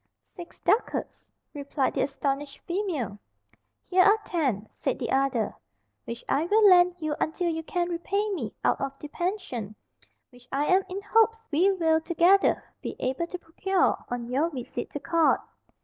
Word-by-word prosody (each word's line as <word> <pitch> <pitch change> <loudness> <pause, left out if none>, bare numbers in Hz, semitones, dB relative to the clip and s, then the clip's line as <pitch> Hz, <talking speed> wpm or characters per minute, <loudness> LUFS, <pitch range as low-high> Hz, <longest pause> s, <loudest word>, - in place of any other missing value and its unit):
"Six 350 -1 -10
ducats," 460 - -1 0.2
replied 280 -2 -1
the - - 0
astonished 275 0 -2
female. 325 - -2 0.7
"Here 370 0 +3
are 410 +3 +6
ten," 265 - -1
said - - -2
the - - -3
other, 265 -5 +1 0.5
"which 235 0 -7
I 290 +4 +1
will 420 +3 +5
lend 360 -1 +6
you 310 -3 -2
until 340 +2 0
you 325 -1 -2
can 345 +2 -2
repay 385 +5 -1
me 250 - -3
out - - +2
of 275 0 -3
the 295 - -9
pension, 295 - -3 0.6
which 245 0 -19
I 280 +2 0
am 370 +4 +4
in 390 +2 -5
hopes 450 +1 +2
we 355 +7 +4
will, 325 -4 +2
together, 345 +4 +3 0.2
be - - -5
able 265 +7 -1
to 360 - -5
procure 365 +3 0
on 240 -1 -4
your 275 +7 +1
visit 255 -7 -6
to 290 - -3
court." 330 +2 +3
325 Hz, 165 wpm, -27 LUFS, 275-370 Hz, 0.7 s, are